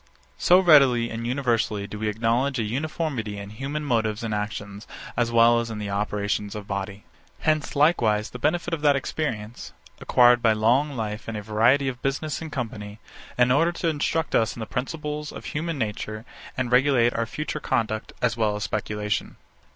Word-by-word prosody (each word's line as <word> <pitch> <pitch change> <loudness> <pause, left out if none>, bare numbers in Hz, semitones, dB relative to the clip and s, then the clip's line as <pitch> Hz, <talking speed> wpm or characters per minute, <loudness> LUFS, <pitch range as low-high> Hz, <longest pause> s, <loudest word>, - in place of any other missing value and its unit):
So 180 +1 +6
readily 135 -9 +5
and 115 +1 -4
universally 120 -5 0
do 105 +1 -8
we 110 - -1
acknowledge 115 +5 0
a 115 - 0
uniformity 130 -3 -3
in 100 0 -8
human 140 +6 -4
motives 110 -4 0
and 110 -2 -2
actions 105 0 -5 0.3
as 120 0 0
well 115 0 +5
as 115 0 -3
in 110 - -5
the 105 -1 -4
operations 105 0 -2
of 105 -1 -6
body. 100 0 -5 0.4
Hence 155 0 0
likewise 120 -8 +2
the 125 - -8
benefit 170 +6 0
of 160 - -2
that 145 -2 +4
experience, 120 -6 -4 0.3
acquired 120 -1 +5
by 115 -2 +4
long 125 +7 +2
life 105 -1 -4
and 115 -1 -4
a 105 - -6
variety 115 +6 +3
of 125 -2 -4
business 145 +3 -2
and 160 -1 -6
company, 110 -5 -5 0.4
in 125 0 +4
order 165 +6 +3
to 170 -1 -1
instruct 160 +1 -1
us 110 -1 +2
in - - -9
the 110 - -3
principles 150 +4 -4
of - - -9
human 165 +1 -3
nature, 110 -1 -4 0.3
and 125 -2 -1
regulate 125 -2 +4
our 115 0 -1
future 155 +4 -4
conduct, 110 -5 -1
as 120 -1 +2
well 110 -3 +1
as 105 - -4
speculation. 105 0 -2
115 Hz, 180 wpm, -25 LUFS, 105-140 Hz, 0.4 s, So